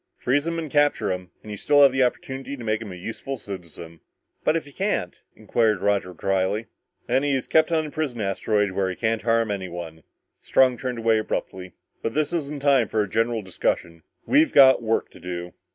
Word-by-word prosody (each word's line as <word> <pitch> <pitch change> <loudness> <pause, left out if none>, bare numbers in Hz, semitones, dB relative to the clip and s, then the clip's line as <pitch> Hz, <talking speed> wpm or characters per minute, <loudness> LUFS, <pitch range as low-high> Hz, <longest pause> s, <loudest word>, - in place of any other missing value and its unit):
Freeze 145 +5 0
him 165 0 -2
and 160 -4 -5
capture 145 -7 +2
him, 90 -1 -5
and 105 - -9
you 105 - -5
still 145 +7 +4
have 140 - +7
the 130 +1 0
opportunity 130 +2 -2
of - - -15
making 110 -1 -2
him 95 - -7
a - - -8
useful 110 +8 -6
citizen." 85 -5 -9 0.4
"But 155 - +2
if 165 - -1
you 145 - -14
can't?" 190 - -2
inquired 110 -4 +1
Roger 100 -1 0
dryly. 95 +5 0 0.4
"Then 135 - +1
he's 140 -2 0
kept 160 +1 +3
on 160 -1 +1
the 150 - -7
prison 145 -7 -3
asteroid 105 0 0
where 95 0 -1
he 95 - -4
can't 115 0 -1
harm 115 -1 +1
anyone." 85 -4 -6 0.4
Strong 130 -3 +3
turned 125 +1 -3
away 115 -1 +2
abruptly. 95 -4 -4 0.3
"But 115 - -3
this 155 +2 0
isn't 145 -4 -3
the - - -1
time 135 -5 +4
for 110 0 0
a - - -5
general 115 +2 0
discussion. 85 -2 -2 0.2
We've 300 +2 +4
got 135 -3 +7
work 115 -1 -1
to - - -15
do!" 90 0 -6
115 Hz, 205 wpm, -24 LUFS, 95-140 Hz, 0.4 s, have